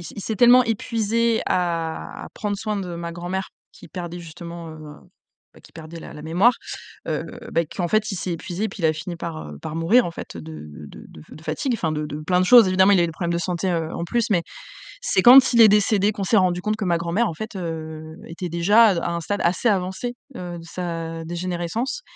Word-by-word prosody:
il 205 - -6
s'est 220 - -3
tellement 245 +1 +7
épuisé 230 0 0
à 165 -3 -2
à - - -11
prendre 205 -2 -3
soin 215 0 -3
de 180 -3 -5
ma 170 0 -5
grand-mère 180 +3 -4 0.2
qui - - -14
perdait 175 -1 -6
justement, 170 0 -9
heu, 160 - -10 0.8
ben - - -18
qui - - -18
perdait 160 +1 -9
la - - -10
la 150 - -9
mémoire, 180 +10 +3 0.6
heu, - - -1 0.3
beh 165 0 +1
qu'en 175 +2 -3
fait, 215 0 +1
il - - -3
s'est 180 - -3
épuisé 175 +4 -5
et - - -2
puis 195 - -10
il - - +5
a 155 - +3
fini 165 +3 -6
par, 160 - -6
heu, 75 - -9
par 155 - -6
mourir 195 +10 +4
en 170 - -4
fait 85 - -8
de 80 -1 -9 0.2
de - - -12
de 75 - -14
de 155 - -13
fatigue. 265 - -2
Enfin 165 -7 -1
de 150 0 -2
de 150 0 -6
plein 180 +3 +1
de 185 - +2
choses 240 -1 +8
évidemment, 190 +2 +5
il - - +5
y - - +4
a - - +3
eu - - +1
des 165 - -5
problèmes 170 +1 -3
de - - 0
santé, 180 +1 -2
heu, 165 -1 -2
en - - -4
plus, 235 +4 0
mais, 185 -5 +3 0.6
c'est 190 - +2
quand 260 +3 +8
il 235 - +4
est 220 - +10
décédé 210 0 +3
qu'on 200 -1 -4
s'est 215 - +2
rendus 180 -2 +2
compte 215 0 -1
que 215 - -3
ma 170 -2 +2
grand-mère 170 +8 0
en 165 - -5
fait, 220 +5 -7
heu, 160 -2 -6
était 175 +2 -5
déjà 195 +8 +5
à 200 - +4
d 170 - -1
à - - -2
un 170 - -2
stade 205 +5 -3
assez 180 +7 +2
avancé, 190 +5 -1 0.2
heu, 175 -1 -6
de 165 - -12
sa 165 -2 -5
dégénérescence 175 - -3
175 Hz, 245 wpm, -23 LUFS, 165-210 Hz, 0.8 s, est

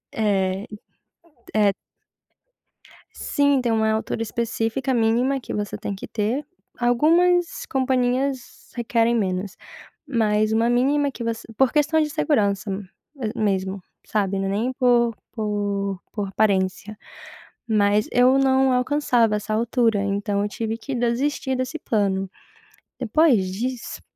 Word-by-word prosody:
É, 195 -2 0 0.9
é 210 -2 +4 1.4
sim, 285 -1 +1
tem 240 - 0
uma 220 -1 +2
altura 220 +1 -2
específica 230 +3 -2
mínima 240 +4 +2
que - - -7
você 205 -1 -3
tem 200 - -4
que 195 - -9
ter, 230 +7 -1 0.3
algumas 335 +9 +2
companhias 260 0 -1
requerem 235 0 +1
menos, 190 -3 -2 0.5
mas 215 -4 +1
uma 225 +1 +2
mínima 280 +4 +2
que 250 - -7
você 230 0 -3
por 265 +2 +3
questão 300 +1 +2
de 305 -1 0
segurança 200 - 0 0.5
a 230 0 -3
mesmo, 195 -2 0 0.3
sabe, 200 -2 0
não 195 - -1
é - - -1
nem 225 +6 -1
por 240 -3 +3 0.2
por 205 -3 -2
por 205 -2 -3
aparência, 195 0 0 0.7
mas 210 -1 +2
eu 250 +2 +5
não 265 -1 +3
alcançava 250 -4 +2
essa 210 +1 -4
altura, 225 -1 +1
então 200 0 -1
eu 205 - -2
tive 225 +1 -3
que 270 +4 -6
desistir 260 +3 0
desse 255 +5 -3
plano. 195 -6 0 0.7
Depois 250 -3 +3
disso, 235 +6 -4
225 Hz, 125 wpm, -23 LUFS, 205-255 Hz, 1.4 s, eu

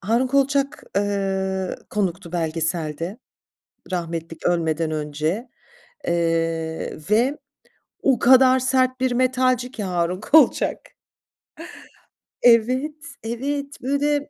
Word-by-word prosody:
Harun 230 +6 +1
Kolçak, 275 +1 +1
eee, 190 -2 -1
konuktu 185 -3 -2
belgeselde, 165 +2 -2 0.7
rahmetli 165 -2 -4
k - - 0
ölmeden 165 -2 0
önce, 155 - -2 0.6
eee, 165 -1 -1
ve 250 +7 +3 0.7
o 270 -2 +3
kadar 260 +1 +6
sert 255 0 +1
bir 260 -1 +1
metalci 255 0 +1
ki 220 -5 -5
Harun 180 0 -1
Kolçak. 310 +8 +3 1.5
Evet, 250 +5 +4 0.3
evet, 280 +5 -3
böyle 285 +2 0
210 Hz, 90 wpm, -22 LUFS, 170-260 Hz, 1.5 s, kadar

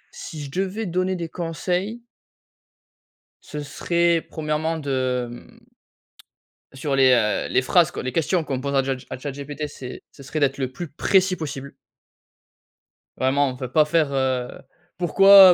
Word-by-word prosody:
si 160 - -7
je 140 - -8
devais 195 +5 -2
donner 185 +1 0
des 170 -2 -4
conseils 180 +7 -3 1.4
ce 150 - -6
serait 170 +3 +1
premièrement 155 +1 -1
de, 130 -4 -1
hem, 120 - -13 1.2
sur 135 +1 -1
les, 130 -1 +6
heu, 105 -4 +2
les 130 - +4
phrases 165 +4 +4
quoi - - -5
les 130 -1 -3
questions 165 +2 +1
qu'on 135 -3 -2
pose 140 0 -3
à 135 - +4
jat 135 0 -1
à - - -5
Chat 140 +2 -5
GPT, 145 +2 -6
c'est 130 -3 -9
c'est 140 - -14
serait 150 +3 -4
d'être 140 -1 +2
le 130 -2 -1
plus 175 +4 -6
précis 185 +4 +3
possible 140 -4 -6 1.4
vraiment, 135 +2 +2
enfin, 130 0 -5
pas 150 +4 +4
faire, 155 -2 +2
heu: 130 -2 0 0.5
«Pourquoi 195 +2 +8
150 Hz, 155 wpm, -23 LUFS, 135-170 Hz, 1.4 s, Pourquoi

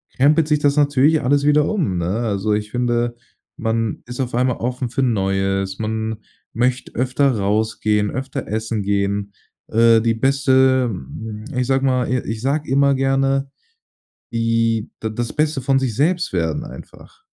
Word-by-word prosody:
krempelt 150 +4 +3
sich 150 -1 +3
das 145 0 +2
natürlich 145 +1 +3
alles 140 +2 +2
wieder 150 0 +4
um 150 - -1
ne? 85 - -2
Also 105 0 -1
ich 105 0 -4
finde, 120 -1 0 0.4
man 115 -1 -1
ist 125 +2 -7
auf 125 -2 -3
einmal 125 0 +1
offen 125 +1 -3
für 135 +3 -1
Neues. 95 -3 0
Man 110 0 -3 0.4
möchte 125 +2 -1
öfter 130 0 +1
rausgehen, 105 0 0
öfter 130 +1 -5
essen 110 0 -2
gehen. 100 0 -1 0.3
Äh, 115 0 +4
die 115 0 +1
Beste, 130 0 +3 0.7
ich 125 0 0
sage 135 0 +1
mal 125 -2 +1
i 130 - +2
ich 110 0 -4
sage 145 +3 -1
immer 140 0 +4
gerne, 135 0 +1 0.8
die 115 -1 0
da 110 - -3
das 115 +2 -4
Beste 150 -2 0
von 135 +1 +2
sich 130 -5 -1
selbst 170 - +1
werden 90 - -1
einfach. 440 - -13
125 Hz, 155 wpm, -20 LUFS, 110-135 Hz, 0.8 s, wieder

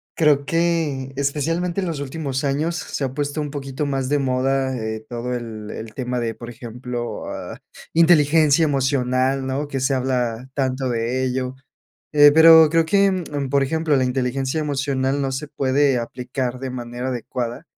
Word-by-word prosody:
Creo 145 -3 +3
que 160 -5 0
especialmente 165 +6 -1
en 185 - -2
los 160 -4 -3
últimos 140 -1 -3
años 150 +4 0
se 150 - -4
ha 130 -1 -2
puesto 145 +1 -2
un 145 - -3
poquito 140 0 -4
más 135 -2 -2
de 145 0 +2
moda, 130 0 0
eh, 110 -1 -4
todo 120 +1 -4
el 110 -3 -6
el 110 0 -8
tema 125 0 -3
de, 115 -1 -2
por 120 +1 -10
ejemplo, 120 +1 -6
ah, - - -7 0.3
inteligencia 160 -2 +5
emocional, 135 -1 +1
¿no? 135 +3 -2
que 140 -2 -3
se 130 +2 +1
habla 125 -2 -1
tanto 130 -1 -1
de 120 +2 -1
ello. 130 0 -2 0.6
Eh, 145 -1 +8
pero 160 0 +8
creo 165 0 +3
que, 195 -1 +2 0.3
por 140 0 +3
ejemplo, 160 +1 +1
la 130 - +2
inteligencia 130 +3 -1
emocional 140 -2 -1
no 135 -1 -1
se 140 +3 -4
puede 140 -1 +2
aplicar 125 +1 -4
de 135 -1 -4
manera 120 0 -5
adecuada 120 -1 -4
135 Hz, 165 wpm, -21 LUFS, 125-145 Hz, 0.6 s, Eh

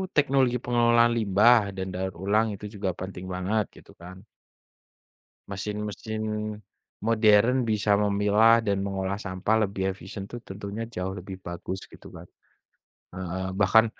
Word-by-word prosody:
teknologi 135 -4 +3
pengelolaan 120 -1 +3
limbah 105 0 +4
dan 95 0 -4
daur 95 +1 -2
ulang 105 +3 +2
itu 105 +1 -8
juga 100 -2 -1
penting 95 +1 -7
banget 100 +4 0
gitu - - -18
kan. 90 +2 -10 1.3
Mesin-mesin 105 +2 -4 0.8
modern 115 +3 +4
bisa 105 -2 +2
memilah 105 +3 +4
dan 100 -3 -1
mengolah 95 0 -2
sampah 105 +2 0
lebih 95 -1 -2
efisien 100 +2 -8
itu - - -7
tentunya 100 +3 -6
jauh 95 -4 -5
lebih 95 0 -8
bagus 90 +2 -6
gitu - - -14
kan. - - -11 0.9
Heeh, 95 +1 -4
bahkan 105 +3 +5
100 Hz, 130 wpm, -26 LUFS, 95-110 Hz, 1.3 s, bahkan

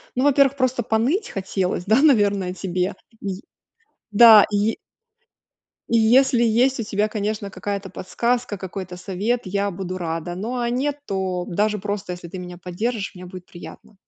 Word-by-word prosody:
ну, 255 - +1
во-первых, 280 -1 +4
просто 255 -2 0
поныть 245 - 0
хотелось, 190 -2 -2
да, 220 +6 +4
наверное, 205 -10 +3
тебе, 185 0 -2 0.3
и 195 -1 -4 0.7
да 220 -1 +9
и 205 +2 +1 1.1
И 230 - +2
если 240 +2 +4
есть 245 +4 +2
у - - -1
тебя, 210 0 -1
конечно, 210 -1 -3
какая-то 200 -1 -5
подсказка, 235 +4 -2
какой-то 185 -1 -7
совет, 200 +6 -2
я 200 +2 -1
буду 185 0 -5
рада. 165 0 -4
Но, 235 +7 -4
а 235 0 -1
нет, 275 +4 -1
то 190 -2 -2
даже 210 +3 0
просто, 205 -2 -4
если 175 -1 -8
ты 185 +2 -8
меня 180 -1 -8
поддержишь, 200 +5 -3
мне 180 0 -10
будет 180 0 -10
приятно. 190 +4 -12
205 Hz, 160 wpm, -22 LUFS, 185-235 Hz, 1.1 s, да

